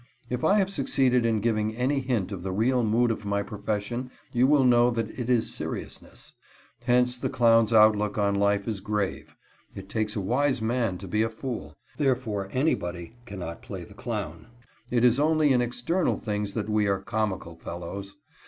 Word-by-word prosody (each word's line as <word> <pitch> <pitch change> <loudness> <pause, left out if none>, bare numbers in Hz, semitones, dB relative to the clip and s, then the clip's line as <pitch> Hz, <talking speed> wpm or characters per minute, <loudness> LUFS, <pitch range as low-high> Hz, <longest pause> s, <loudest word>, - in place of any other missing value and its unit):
If 125 0 -2
I 200 - +4
have 195 -1 +1
succeeded 130 -6 +2
in 110 -2 +1
giving 110 -1 0
any 130 +4 +1
hint 120 -7 -1
of 95 -3 -5
the 95 +1 -4
real 120 +6 +2
mood 115 +2 +2
of 110 - -4
my 100 0 -1
profession, 105 +4 -3 0.2
you 125 +1 +4
will 145 -1 +4
know 120 -1 +5
that 115 -2 -2
it 125 -1 -5
is 120 -3 +2
seriousness. - - -7 0.5
Hence 125 0 +3
the - - -1
clown's 115 -3 +4
outlook 105 -2 +4
on 100 -1 +2
life 100 0 +1
is 110 -3 -2
grave. 105 -1 -3 0.4
It 95 0 -9
takes 110 0 -2
a - - -1
wise 130 +6 +1
man 115 -3 0
to 95 - -9
be 105 +4 0
a 115 - +1
fool. 110 - -6 0.2
Therefore 125 -8 0
anybody 90 - -1
cannot 90 -5 -6
play - - -7
the - - -13
clown. 80 +6 -5 0.4
It 120 0 +2
is 125 +2 +4
only 155 -1 +3
in 125 - +3
external 125 +9 0
things 105 -1 -3
that 105 -2 -2
we 105 -1 +1
are 100 -1 +1
"comical 95 -4 -3
fellows." 90 +4 -7
110 Hz, 180 wpm, -26 LUFS, 100-125 Hz, 0.5 s, know